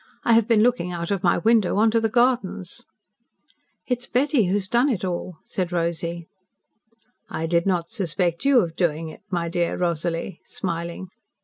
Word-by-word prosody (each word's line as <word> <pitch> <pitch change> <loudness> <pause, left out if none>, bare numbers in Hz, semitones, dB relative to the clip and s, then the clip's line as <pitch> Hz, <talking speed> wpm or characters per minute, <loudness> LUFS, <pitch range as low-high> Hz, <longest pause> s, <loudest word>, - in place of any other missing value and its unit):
I 230 - +4
have 225 -1 +4
been 225 -3 +4
looking 235 -7 +1
out 170 +1 -4
of 195 -3 0
my 175 - +3
window 220 0 +3
on 220 +1 +4
to 230 - +3
the 225 0 0
gardens." 240 -6 0 1.0
"It 250 -2 -1
is 245 - -9
Betty 260 -2 +2
who 180 - 0
has 200 -2 -1
done 240 +6 +3
it 205 -7 -1
all," 180 -1 -4
said 180 -2 -3
Rosy. 170 0 -2 1.0
"I 160 +1 -3
did 170 +2 +1
not 175 -3 +1
suspect 175 -4 -1
you 275 -3 +5
of 165 -4 -4
doing 165 -2 -1
it, 155 - -12
my 170 -3 -1
dear 170 0 -1
Rosalie," 170 0 -2
smiling. 170 +1 -4
180 Hz, 180 wpm, -23 LUFS, 170-225 Hz, 1.0 s, you